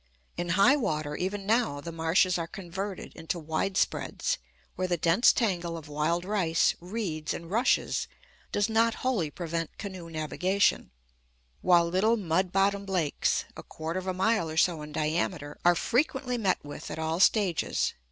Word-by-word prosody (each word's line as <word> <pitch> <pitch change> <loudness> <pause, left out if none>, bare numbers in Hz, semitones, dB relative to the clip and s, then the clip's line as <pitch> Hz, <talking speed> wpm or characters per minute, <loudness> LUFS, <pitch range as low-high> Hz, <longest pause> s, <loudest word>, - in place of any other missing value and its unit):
In 175 0 -3
high 240 +8 +6
water, 155 - -2
even 195 +3 -3
now, 220 -9 +1
the 170 +4 -6
marshes 165 +3 +2
are 165 - -3
converted 190 +1 -6
into 165 +2 -4
widespreads, 185 - -1 0.4
where 185 - -1
the 175 -1 0
dense 170 +8 +5
tangle 175 -7 -1
of 160 -2 -10
wild 155 +4 -1
rice, 185 -5 +2
reeds, 175 -5 -3
and 170 +1 -8
rushes 230 +4 +1 0.4
does 205 0 +1
not 225 +1 +2
wholly 215 -12 +1
prevent 165 0 -4
canoe 190 -5 -7
navigation; 180 +5 +1 0.7
while 175 -2 +5
little 205 +7 +2
mud 185 -1 0
bottomed 195 +1 +1
lakes, 170 -6 0
a - - -7
quarter 160 +3 -5
of 185 - -8
a - - +1
mile 190 -2 +1
or 155 - -6
so 165 -1 +3
in 150 0 -8
diameter, 150 0 -2
are 175 0 +5
frequently 255 - 0
met 195 -9 0
with 145 - -8
at - - -5
all 160 +1 -1
stages. 190 -3 +2
180 Hz, 160 wpm, -28 LUFS, 160-200 Hz, 0.7 s, high